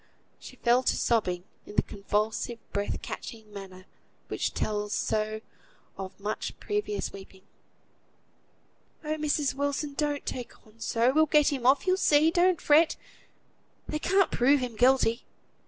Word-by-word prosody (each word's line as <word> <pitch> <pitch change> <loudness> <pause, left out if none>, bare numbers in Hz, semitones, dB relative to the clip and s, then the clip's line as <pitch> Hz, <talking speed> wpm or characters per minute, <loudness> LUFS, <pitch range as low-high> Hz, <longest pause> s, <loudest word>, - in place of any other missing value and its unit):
She 255 - -11
fell 245 0 +3
to - - +1
sobbing, 185 -7 +1 0.2
in 205 - -10
the - - +4
convulsive 215 +3 -2 0.2
breath 200 0 -2
catching 220 -2 -8
manner 190 -2 -10 0.4
which - - -1
tells 210 -1 -2
so 215 0 -1 0.5
of 190 0 -8
much 210 +2 -4
previous 415 0 -2
weeping. 190 -1 -12 1.6
"Oh! 310 +1 -2
Mrs. 295 -2 0
Wilson, 285 +1 -2
don't 290 0 -2
take 245 -2 -7
on 215 +1 -22
so! 235 +3 +1
We'll 315 +1 +4
get 300 0 +4
him 255 -3 -1
off, 275 +6 +4
you'll 370 0 +3
see. 310 -2 +4
Don't 355 0 +3
fret; 310 +2 +4 0.9
they 305 - -2
can't 385 +3 +2
prove 275 +4 +4
him 250 -3 -4
guilty!" 245 -1 +3
250 Hz, 140 wpm, -28 LUFS, 215-300 Hz, 1.6 s, the